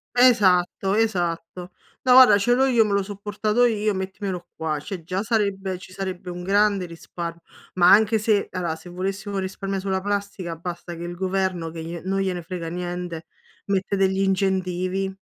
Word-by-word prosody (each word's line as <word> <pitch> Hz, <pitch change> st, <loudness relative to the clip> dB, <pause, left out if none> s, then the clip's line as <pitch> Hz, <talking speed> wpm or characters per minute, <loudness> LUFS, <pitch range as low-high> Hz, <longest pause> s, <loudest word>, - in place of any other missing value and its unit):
Esatto, 195 Hz, -6 st, +4 dB
esatto. 180 Hz, -4 st, -1 dB, 0.3 s
"No, 255 Hz, -, +5 dB
guarda, 250 Hz, -5 st, +9 dB
ce 240 Hz, +4 st, +2 dB
l'ho 265 Hz, +1 st, +3 dB
io. 240 Hz, -4 st, +4 dB
Me 210 Hz, -, -1 dB
l'ho 200 Hz, 0 st, +2 dB
so' 205 Hz, +1 st, -7 dB
portato 210 Hz, +3 st, +1 dB
io. 215 Hz, -2 st, +1 dB
Mettimelo 190 Hz, -2 st, -4 dB
qua." 155 Hz, -2 st, -2 dB
Cioè 180 Hz, +3 st, -7 dB
già 185 Hz, +4 st, -2 dB
sarebbe 200 Hz, -4 st, -1 dB
ci 185 Hz, +1 st, -13 dB
sarebbe 185 Hz, -1 st, -5 dB
un 175 Hz, 0 st, -7 dB
grande 200 Hz, 0 st, +2 dB
risparm 170 Hz, 0 st, -7 dB, 0.4 s
ma 175 Hz, -1 st, +5 dB
anche 220 Hz, +1 st, +5 dB
se 215 Hz, -1 st, +1 dB
ala 175 Hz, -3 st, -2 dB
se 160 Hz, +2 st, -13 dB
volessimo 195 Hz, +3 st, -4 dB
un 195 Hz, -, 0 dB
risparmio 195 Hz, +1 st, -3 dB
sulla 190 Hz, 0 st, -1 dB
plastica, 200 Hz, -4 st, -3 dB
basta 175 Hz, +1 st, -6 dB
che 170 Hz, -, -7 dB
il 175 Hz, 0 st, -5 dB
governo, 185 Hz, -2 st, -1 dB
che 160 Hz, 0 st, -7 dB
glie 170 Hz, 0 st, -6 dB
non 195 Hz, +1 st, -1 dB
gliene 185 Hz, -2 st, -1 dB
frega 170 Hz, -1 st, -5 dB
niente, 175 Hz, -2 st, -5 dB, 0.4 s
mette 195 Hz, 0 st, 0 dB
degli 190 Hz, 0 st, +2 dB
incentivi. 190 Hz, 0 st, 0 dB
190 Hz, 175 wpm, -23 LUFS, 175-200 Hz, 0.4 s, guarda